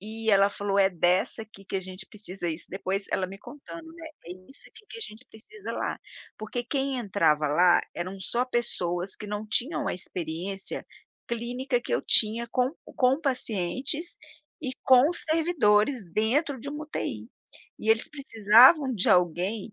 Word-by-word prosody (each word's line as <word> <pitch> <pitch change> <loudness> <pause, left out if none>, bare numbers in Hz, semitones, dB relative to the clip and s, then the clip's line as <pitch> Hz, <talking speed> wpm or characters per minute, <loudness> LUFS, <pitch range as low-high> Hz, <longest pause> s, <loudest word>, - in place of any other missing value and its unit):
e 220 +2 -3
ela 200 0 +5
falou: 200 0 -1
“É 195 0 +5
dessa 180 +5 +1
aqui 195 -2 -15
que 195 - -4
a 190 - -1
gente 185 +1 -8
precisa”. 195 -4 -6
Isso, 160 +1 -6
depois 195 +1 -2
ela 185 - 0
me 195 +1 -10
contando, 295 +7 -11
né: 330 -1 -10 0.2
“É 175 - -6 0.2
isso 275 - -14
aqui 445 -1 -17
que 455 - -8
a - - -10
gente 225 - -8
precisa 400 - -10
lá”, - - -3 0.4
porque 235 +3 -4
quem 270 0 -1
entrava 185 -9 +2
lá 175 +4 +5
eram 185 +3 -5
só 240 +6 0
pessoas 190 -7 -2
que 210 - -8
não 210 +1 -4
tinham 290 +7 +1
a - - -1
experiência 180 +2 -4 0.4
clínica 245 +2 -2
que - - -2
eu - - -1
tinha 225 +2 +4
com 255 +3 +1 0.2
com 265 +1 +3
pacientes 260 - -1 0.4
e 265 - -3
com 260 +6 +6
servidores 280 - +2
dentro 265 +6 +1
de 280 - -7
uma 295 +1 -6
UTI, 300 - -5 0.5
e 220 - 0
eles 225 +1 +2
precisavam 260 +1 +5
de 210 +3 +1
alguém 185 +4 +1
220 Hz, 165 wpm, -27 LUFS, 190-265 Hz, 0.5 s, com